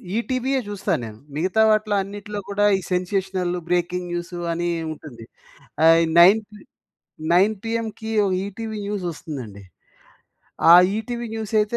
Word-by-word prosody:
ఈటీవీయే 255 +3 -1
చూస్తాను 205 -8 -2
నేను. 110 -1 -10 0.2
మిగతా 185 +7 +1
వాటిలో 215 -1 +2
అన్నిటిలో 205 +1 -6
కూడా, 205 +1 +1
ఈ - - -4
సెన్సేషనల్, 185 0 -1 0.2
బ్రేకింగ్ 180 0 -1
న్యూసు, 175 +1 -5
అని 170 +1 -2 0.2
ఉంటుంది.ఆహ్, 120 -7 -12 0.6
ఈ - - -1
nine 195 +6 +7
P 210 - -13 0.7
nine 195 +5 +4
పీఎంకి 225 -1 -4 0.3
ETV 220 +2 -6
news 200 -1 -3
వస్తుందండి. 130 - -8 1.1
ఆ - - +11 0.2
ఈటీవీ 240 +1 -4
న్యూస్ 220 -2 -5
అయితే, 210 +3 -1
200 Hz, 130 wpm, -22 LUFS, 175-220 Hz, 1.1 s, ఆ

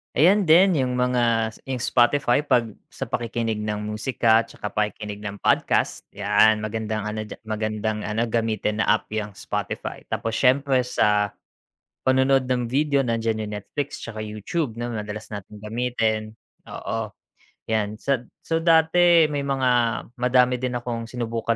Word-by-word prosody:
Ayan 185 +7 +4
din 175 +1 +6
yung 125 -1 0
mga, 120 -3 +1
si - - -17
yung 130 -2 -3
Spotify 120 +1 +3
'pag 120 -6 +1 0.2
sa - - -7
pakikinig 115 -2 -2
ng 105 0 -3
musika, 110 +1 +2
'tsaka 105 - -7
pakikinig 105 -1 -3
ng 105 -1 -6
podcast, - - +1
'yan 105 +2 +3
magandang 110 -1 -3
ano 105 0 -4
diya - - -8
magandang 110 0 -2
ano 110 +2 -1
gamitin 110 -2 -1
na - - +1
app 110 - -8
'yang 105 -2 -4
Spotify. - - -5
Tapos 115 -1 -2
siyempre 130 -1 +3
sa 105 -3 +1 0.7
panonood 130 0 +3
ng 125 -1 0
video, 140 +3 +1
nandiyan 115 -3 -1
yung 105 - -6
Netflix 140 +7 -5
tsaka 110 -2 -7
YouTube 110 - -3
'no, 120 +1 -4
madalas 110 -1 -6
nating 105 +1 -9
gamitin, 110 -1 -1 0.3
oo. 110 -2 -5 0.6
'Yan 105 -1 0
sad 125 +1 -2 0.2
so, 165 0 0
dati 165 +1 +5
may 140 -1 -2
mga 135 -2 +1 0.5
madami 125 0 +3
din 125 -1 -2
akong 120 -1 -4
sinubukan 115 -1 -2
115 Hz, 150 wpm, -24 LUFS, 110-130 Hz, 0.7 s, din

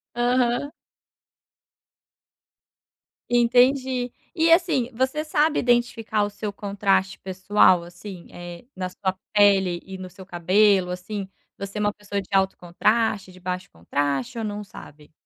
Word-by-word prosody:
Aham. 245 +3 +1 2.6
Entendi, 250 +1 +3 0.2
e 330 0 +3
assim, 330 -8 +3
você 260 +5 -1
sabe 305 0 +2
identificar 240 -3 +1
o 205 - -2
seu 205 +1 -5
contraste 200 -1 0
pessoal, 185 -1 +3
assim, 175 +1 -10
eh, 175 +1 -9
na 185 -1 -3
sua 190 +1 -2 0.2
pele 195 -4 +4
e 190 0 -8
no 185 - -7
seu 185 +1 -13
cabelo, 185 +2 +3
assim, 190 +2 -5 0.3
você 200 +1 -7
é 210 - -1
uma 205 0 +1
pessoa 205 -1 -4
de 195 - -8
alto 190 0 +2
contraste 210 +3 0
de 185 - -15
baixo 180 0 -4
contraste 145 - -2
ou 225 - -3
não 210 0 -4
sabe? 150 -6 -14
205 Hz, 135 wpm, -24 LUFS, 185-240 Hz, 2.6 s, pele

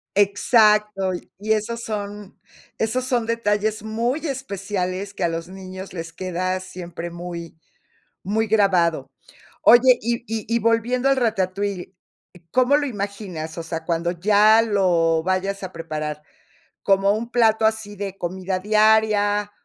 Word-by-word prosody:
Exacto, 210 -1 +3 0.3
y 215 +2 +1
esos 225 +2 -2
son 205 -2 -6 0.4
esos 235 +3 -1
son 245 -3 0
detalles 215 -2 0
muy 230 +6 -1
especiales 200 -7 -3
que - - -3
a - - +3
los 165 0 -4
niños 190 0 -9
les 165 -2 -7
queda 185 +1 -2
siempre 175 -2 -7
muy, 170 -1 -8 0.7
muy 220 +3 0
grabado. 180 -9 +2 0.5
Oye, 245 +1 +7
y 235 +1 -1
y 220 -2 -4
y - - +4
volviendo 235 +3 +1
al 275 - +3
ratatouille, 200 -5 -1 0.6
¿cómo 255 +3 +4
lo 295 - -1
imaginas? 200 - -5
O 170 - -4
sea, 165 0 -5
cuando 170 0 0
ya 210 +5 +5
lo 175 -7 +2
vayas 190 +2 -1
a 185 0 -6
preparar, 155 -2 -5 0.6
¿como 195 0 +3
un 225 +2 -4
plato 225 -2 +3
así 220 -2 -1
de 195 -1 -5
comida 185 +1 -3
diaria, 210 0 +3
200 Hz, 135 wpm, -22 LUFS, 185-220 Hz, 0.7 s, Oye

